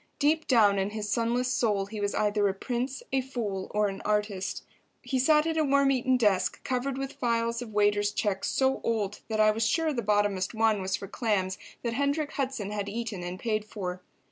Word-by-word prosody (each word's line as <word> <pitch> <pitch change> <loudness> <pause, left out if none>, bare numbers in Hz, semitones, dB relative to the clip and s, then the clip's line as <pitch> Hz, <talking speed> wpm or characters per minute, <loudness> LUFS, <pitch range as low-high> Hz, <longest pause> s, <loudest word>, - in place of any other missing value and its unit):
Deep 310 +2 +2
down 210 -6 +5
in 195 +1 0
his 210 0 -4
sunless 235 +4 +1
soul 210 -6 +1
he 210 +1 -6
was 205 0 -1
either 210 -1 +2
a 195 - -1
prince, 250 +5 -3
a 265 - +3
fool 225 -8 -4
or 210 0 +1
an 195 -1 -5
artist. 210 -2 -1 0.4
He 265 - -1
sat 300 +3 +4
at 325 0 -1
a 315 - +3
worm 280 -1 +3
eaten 255 0 +2
desk, 205 -6 +2
covered 260 +1 -1
with 270 0 -4
files 230 -1 0
of 235 -3 -7
waiters' 205 0 +2
checks 205 -2 -1
so 265 0 +1
old 210 -3 -1
that 220 -1 -2
I 215 0 +6
was 220 +1 0
sure 320 +6 +1
the 240 - -1
bottomest 205 -1 +1
one 220 -2 +2
was 190 0 -1
for 200 -1 -7
clams 195 -4 -1 0.2
that 235 -1 -1
Hendrik 285 +4 0
Hudson 260 -8 -3
had 205 -1 -3
eaten 220 -3 -4
and 175 +1 -5
paid 215 -1 -1
for. 185 -4 -5
220 Hz, 205 wpm, -28 LUFS, 205-255 Hz, 0.4 s, I